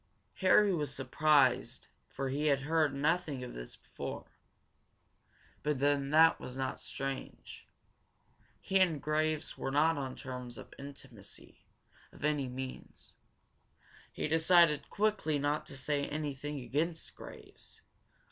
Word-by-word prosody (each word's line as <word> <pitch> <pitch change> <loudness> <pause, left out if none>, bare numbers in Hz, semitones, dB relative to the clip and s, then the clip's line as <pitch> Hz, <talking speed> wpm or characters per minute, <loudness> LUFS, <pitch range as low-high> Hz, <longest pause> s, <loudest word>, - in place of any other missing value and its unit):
Harry 200 +1 +5
was 150 -4 -1
surprised 130 -2 +2 0.2
for 135 -1 -3
he 145 +3 0
had 140 -2 +3
heard 155 0 +2
nothing 150 -1 0
of 125 - -7
this - - -8
before. - - -7 1.4
But 150 -1 0
then 140 0 +1
that 160 +2 +6
was 125 - -8
not 130 0 -3
strange. 135 -1 -6 0.9
He 195 - +1
and 170 -5 +3
Graves 155 +1 -1
were - - -2
not 150 +2 +3
on 130 -2 -4
terms 125 -2 -7
of - - -11
intimacy, 140 0 -11 0.4
by 150 - -1
any 145 -3 -1
means. 130 +1 -8 1.0
He - - -3
decided 160 -1 +4
quickly 210 -8 +1
not 145 +1 -1
to 135 - -7
say 140 +1 -1
anything 145 -1 -4
against 155 +7 -2
Graves. - - -12
145 Hz, 125 wpm, -32 LUFS, 135-155 Hz, 1.4 s, that